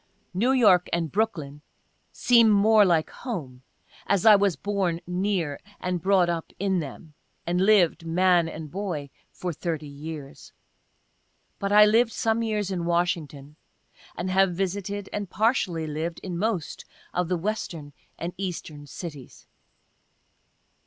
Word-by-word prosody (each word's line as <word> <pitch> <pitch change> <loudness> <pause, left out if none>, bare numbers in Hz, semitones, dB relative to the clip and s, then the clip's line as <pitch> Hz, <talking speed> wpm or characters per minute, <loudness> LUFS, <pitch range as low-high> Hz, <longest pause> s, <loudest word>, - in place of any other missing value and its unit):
(New 225 +8 +2
York 205 -9 +4
and 165 -3 -1
Brooklyn 160 -9 -2 0.5
seem 235 -2 +4
more 210 +1 +5
like 170 -5 +2
home, 150 - -6 0.5
as 200 -3 +1
I 215 -1 +9
was 200 -3 +2
born 190 0 -1
near, 180 -4 -1 0.2
and 180 -1 -2
brought 190 -1 +3
up 170 -1 -3
in 190 -1 0
them, 150 +1 -8 0.3
and 175 +1 0
lived, 190 -4 +4
man 175 0 +3
and 155 -2 -8
boy, 175 -8 -4 0.2
for 180 -2 -4
30 155 -1 -4
years. 145 0 -9 1.1
But 200 -1 -2
I 210 0 +8
lived 225 +2 +3
some 225 0 0
years 210 -3 -1
in 175 -3 -2
Washington, 165 -4 -2 0.6
and 185 +1 -2
have 190 -1 +3
visited, 200 +2 -3
and 205 -3 -3
partially 195 -7 0
lived, 160 +2 -4
in 185 -2 -4
most 190 -3 -2 0.3
of 180 -1 0
the 180 +1 0
Western 165 -6 -4 0.2
and 175 +1 -5
Eastern 165 -6 -6
cities.) 145 -5 -9
180 Hz, 135 wpm, -25 LUFS, 160-200 Hz, 1.1 s, I